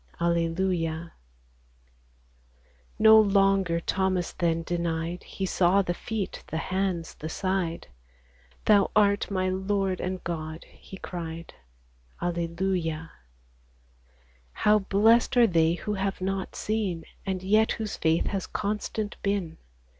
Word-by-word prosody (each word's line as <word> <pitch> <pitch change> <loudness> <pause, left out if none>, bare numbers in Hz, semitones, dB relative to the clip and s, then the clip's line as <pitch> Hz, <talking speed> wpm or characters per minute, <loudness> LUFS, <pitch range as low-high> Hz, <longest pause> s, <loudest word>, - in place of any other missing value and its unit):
Alleluia! 170 -1 0 1.8
No 220 0 +8
longer 195 -4 +3
Thomas 185 0 -1
then 165 -1 0
denied; 170 0 -2
He 195 - -5
saw 190 +1 +3
the 175 - -1
feet, 210 +2 -4
the 160 - -3
hands, 185 -1 -2
the 155 - -7
side: 185 -1 -2 0.4
" - - -31
Thou 205 -2 +5
art 205 -1 +3
my 185 -2 0
Lord 190 0 -1
and 185 0 -3
God," 160 -1 -5
he 190 - -13
cried. 170 -2 -7 0.7
Alleluia! 170 -1 -2 1.4
How 210 0 +4
blest 220 +5 +3
are 240 - +8
they 165 -4 +3
who 210 +4 -4
have 195 -1 -2
not 190 0 -3
seen, 205 -6 -2 0.2
And 190 -1 -3
yet 215 +3 +3
whose 220 -3 -4
faith 160 +1 +1
has 195 -2 -2
constant 210 +1 -3
been 195 -5 -2
185 Hz, 115 wpm, -27 LUFS, 170-200 Hz, 1.8 s, No